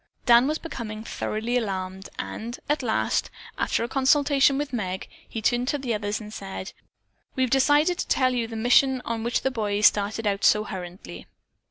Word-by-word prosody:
Dan 240 +1 +6
was 305 +1 0
becoming 220 -10 -6
thoroughly 225 +2 -2
alarmed 190 -4 -4
and, 235 +3 -5
at 295 0 +1
last, 230 -4 0 0.3
after - - 0
a - - -2
consultation 275 +1 +3
with 290 -1 -3
Meg, 190 -5 -3 0.2
he 225 - -5
turned 245 +2 +1
to 290 - +1
the 260 -4 -2
others 205 0 -2
and 215 -1 -10
said: 195 -1 -7 0.6
"We 260 - +1
have 255 - -1
decided 290 +6 +3
to - - -2
tell 255 -1 +2
you 235 -2 -1
the 225 - -8
mission 250 +3 +3
on 230 -1 -3
which 235 +1 0
the 265 - +1
boys 210 -3 0
started 210 +2 +3
out 200 -1 0
so 210 - +5
hurriedly." 185 -3 -8
235 Hz, 185 wpm, -25 LUFS, 210-265 Hz, 0.6 s, Dan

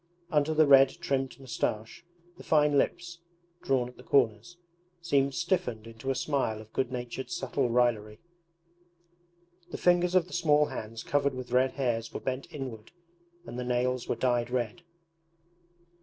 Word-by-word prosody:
Under 155 0 +2
the 155 0 +6
red 135 -1 +7
trimmed 135 -5 -2
moustache 115 -2 -3 0.3
the - - -13
fine 150 -2 +3
lips, 175 +4 -1 0.4
drawn 130 -3 +1
at 125 - -14
the - - -13
corners, 120 +4 +1 0.4
seemed 140 -5 +1
stiffened 170 - -1
into 115 +3 -7
a 135 - +1
smile 135 -6 -1
of 110 0 -14
good 130 -2 -1
natured 125 +1 -5
subtle 135 0 -1
raillery. 115 -3 +1 1.5
The - - -5
fingers 175 0 +3
of 180 -2 +4
the 185 - -13
small 150 -4 +3
hands 115 -3 -7
covered 140 -1 0
with 130 -1 -7
red 130 +1 +3
hairs 120 -4 -1
were - - -5
bent 130 +1 -4
inward, 125 -6 -7 0.5
and 120 +1 -7
the - - -2
nails 125 0 -1
were - - +1
dyed 120 0 0
red. 125 +5 -2
130 Hz, 155 wpm, -29 LUFS, 120-145 Hz, 1.5 s, red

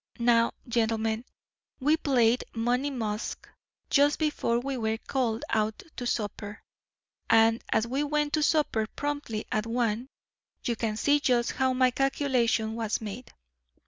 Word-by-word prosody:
Now, 235 -1 +3
gentlemen, 225 0 0 0.5
we 295 +3 +3
played 250 -6 +2
'Money 245 +5 +1
Musk' 220 -5 -4 0.4
just 290 +1 +4
before 300 -6 0
we 270 +2 -3
were 220 -2 -1
called 235 -2 -2
out 215 0 0
to 245 - -4
supper, 210 -2 -4 0.7
and 225 0 +4
as 220 - +2
we 265 +5 -1
went 295 0 0
to 310 - +2
supper 295 -8 +2
promptly 285 -7 -3
at 215 +1 0
one, 235 0 0 0.6
you 235 - 0
can 220 -1 -2
see 290 +5 +3
just 245 -4 +2
how 260 0 +1
my 255 0 +3
calculation 250 -5 +1
was 225 -2 -1
made. 220 +3 -7
235 Hz, 140 wpm, -28 LUFS, 225-270 Hz, 0.7 s, just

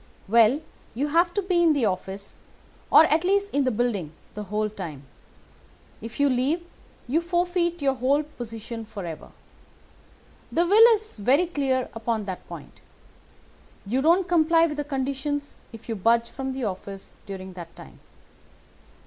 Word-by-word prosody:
"'Well, 230 +6 +4 0.3
you 285 +5 -1
have 340 +3 +3
to 405 - 0
be 360 -2 +2
in 330 -2 +5
the 275 -6 +1
office, 195 +1 -4 0.6
or - - +9
at 315 +2 +2
least 400 +2 +1
in 280 -1 +2
the - - +3
building, 210 -9 -1 0.2
the 210 0 -6
whole 210 +2 -1
time. 170 -9 -7 1.0
If 230 +4 -8
you 285 - +4
leave, 275 +7 0 0.4
you 305 +7 +1
forfeit 345 -1 0
your 270 -1 +3
whole 270 +4 +1
position 230 -5 -7
forever. 195 -7 -8 1.2
The 340 - +2
will 445 +6 +7
is 435 - -8
very 260 - +3
clear 270 -6 -1
upon 225 -1 -2
that 190 -2 -6
point. - - -11 1.0
You 245 +7 0
don't 340 +5 +3
comply 330 -1 +4
with 300 -3 -3
the 295 - -1
conditions 280 +1 -3 0.2
if 225 -1 -12
you 225 - -2
budge 230 +3 +2
from 265 0 -4
the 260 -1 -4
office 195 -1 -6
during 190 -1 -7
that 170 -2 -10
time. - - -13
265 Hz, 155 wpm, -25 LUFS, 215-325 Hz, 1.2 s, or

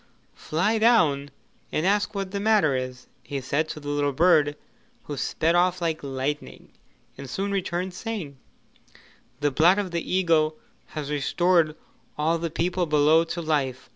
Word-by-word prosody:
'Fly 195 +8 0
down 160 -12 +3 0.4
and 155 - -1
ask 205 +2 +1
what 195 -1 -3
the 200 - -3
matter 205 -9 +3
is,' 130 0 -5 0.2
he 135 +3 -5
said 140 +4 -1
to - - -6
the 145 -1 -7
little 145 -1 0
bird, 150 -2 +3 0.5
who 145 - -6
sped 160 +4 0
off 180 +1 +2
like 165 -2 -2
lightning 140 +2 -4 0.5
and 135 -1 -8
soon 195 +9 -2
returned 185 -1 -2
saying: 185 - -6 1.0
'The 145 0 +2
blood 170 +8 +4
of 200 -3 -2
the 170 -1 -3
eagle 160 -4 +2 0.4
has 150 -1 -4
restored 160 +2 +2 0.4
all 160 +3 +1
the 170 0 -2
people 175 +2 -1
below 150 +2 +4
to 170 +1 -4
life. 140 -5 -1
160 Hz, 155 wpm, -25 LUFS, 145-185 Hz, 1.0 s, blood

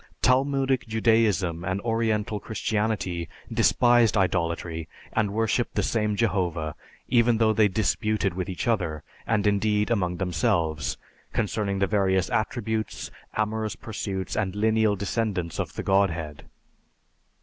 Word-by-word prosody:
Talmudic 135 0 +2
Judaism 110 -7 +2
and 95 +1 -1
Oriental 110 -2 0
Christianity 105 -7 -2 0.2
despised 120 -2 +4
idolatry 85 -3 -1 0.3
and 110 -2 +1
worshipped 110 +3 0
the - - +1
same 105 -2 0
Jehovah, 90 -7 0 0.3
even 120 -1 +3
though 110 -1 +3
they 110 -1 +4
disputed 105 0 0
with 95 +1 -4
each 90 +3 -4
other, 90 -9 0 0.2
and 105 -2 +1
indeed, 105 +1 +2
among 90 -6 0
themselves, 80 -3 0 0.4
concerning 105 -2 -1
the 100 - +2
various 95 -2 +1
attributes, 110 0 -2 0.3
amorous 110 0 -1
pursuits, 95 -4 -4
and 100 -3 -1
lineal 110 0 +2
descendants 100 -4 -2
of - - -3
the - - -4
Godhead. 85 -6 0
105 Hz, 120 wpm, -26 LUFS, 90-110 Hz, 0.4 s, despised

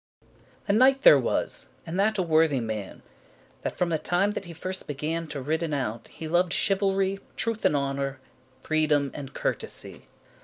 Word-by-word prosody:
A 200 - +3
KNIGHT 265 +5 +5
there - - +9
was, - - -1 0.2
and 170 +3 -3
that 215 +2 +2
a 185 - +2
worthy 160 -4 +3
man, 110 -4 -5 0.6
That - - -4
from 180 - +1
the 160 -2 0
time 185 +6 +1
that 200 - -5
he 175 - -8
first 185 +3 -4
began 155 +3 -3
To 145 -2 -5
riden 160 +1 -1
out, 115 -4 -3
he 160 - -8
loved 175 +2 +2
chivalry, 195 0 +1 0.2
Truth 230 -1 -1
and - - +4
honour, 140 -1 -1 0.4
freedom 150 -3 +2
and 135 -2 -7
courtesy. - - -4
160 Hz, 165 wpm, -27 LUFS, 145-195 Hz, 0.6 s, there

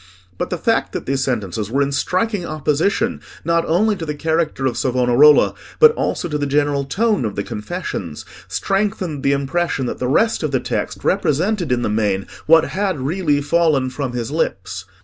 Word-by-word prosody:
But - - -2
the - - -2
fact - - 0
that - - -4
these 135 0 0
sentences 105 -5 -2
were 140 +4 +2
in 140 - -2
striking 185 +7 0
opposition, 165 - 0 0.2
not 170 0 +2
only 210 +6 +2
to 170 - -6
the 150 -2 -3
character 160 -3 -1
of 125 -3 0
Savonarola, 125 +4 +4 0.3
but 460 -1 +8
also 330 - -2
to 150 -2 -2
the 145 - -1
general 145 0 +1
tone 210 - +1
of 105 -3 -3
the 100 - -2
confessions, 105 - -5 0.2
strengthened 195 -7 -1
the 140 - +2
impression 140 +1 -1
that - - -4
the 125 - -1
rest 225 - +2
of 155 - -1
the 135 -2 0
text 125 - -3
represented 180 -1 0
in 120 -1 +1
the - - 0
main 105 -3 0 0.2
what 165 +1 +6
had 190 -5 -1
really 145 +1 0
fallen 150 -5 +2
from 130 -2 -4
his 120 +1 -3
lips. 95 - -2
145 Hz, 185 wpm, -19 LUFS, 130-175 Hz, 0.3 s, but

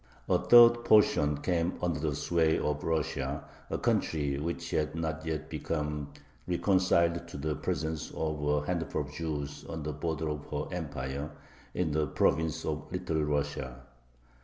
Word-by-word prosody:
A - - +3
third 120 0 +7
portion 75 -10 +4
came 85 0 +1
under 85 -3 -1
the 75 -1 -1
sway 80 +1 +2
of 75 0 -1
Russia, 75 -3 -1 0.3
a - - -1
country 70 -3 0
which 85 +2 -4
had 75 +1 0
not 80 -1 -3
yet 80 -1 -2
become 75 -2 -3 0.4
reconciled 85 -2 +2
to 85 - -8
the 75 +1 -2
presence 80 +3 -2
of 80 -2 -3
a 75 0 +1
handful 85 -3 -1
of - - -10
Jews 75 -3 -4
on 80 -2 -4
the 75 0 -3
border 80 +1 -2
of 75 -1 -5
her - - -4
Empire, 70 -3 -4 0.5
in 90 -4 0
the 75 0 +1
province 80 +3 +1
of 75 -1 -4
Little 90 -4 -1
Russia. 70 -3 -2
80 Hz, 155 wpm, -30 LUFS, 75-85 Hz, 0.5 s, third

